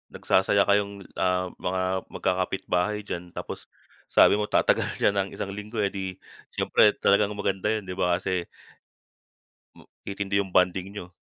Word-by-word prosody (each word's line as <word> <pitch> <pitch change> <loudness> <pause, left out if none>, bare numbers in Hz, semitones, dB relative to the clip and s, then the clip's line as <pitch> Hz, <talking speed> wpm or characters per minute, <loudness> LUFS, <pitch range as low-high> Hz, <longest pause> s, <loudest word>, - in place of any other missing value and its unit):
nagsasaya 100 +1 +3
kayong, 100 -1 +1 0.2
ah, 90 0 +1
mga 95 +1 -1 0.3
magkakapitbahay 95 +2 -1
diyan. 90 -3 -6
Tapos - - -7 0.4
sabi - - +6
mo 105 - -1
tatagal - - +2
siya - - +4
ng 100 0 -1
isang 100 - -4
linggo, 105 +2 -6
eh, 100 - 0
di 95 -2 -5 0.4
syempre 105 - +4
talagang 100 +1 +3
maganda 100 0 -1
yun, 110 -2 -1
di - - -5
ba? 90 -2 +2
Kasi 90 -2 -2 1.3
hmm, - - -18 0.2
titindi 100 0 -1
yung 95 -2 -3
bonding 90 0 +3
niyo. 90 -3 -8
95 Hz, 150 wpm, -26 LUFS, 90-100 Hz, 1.3 s, sabi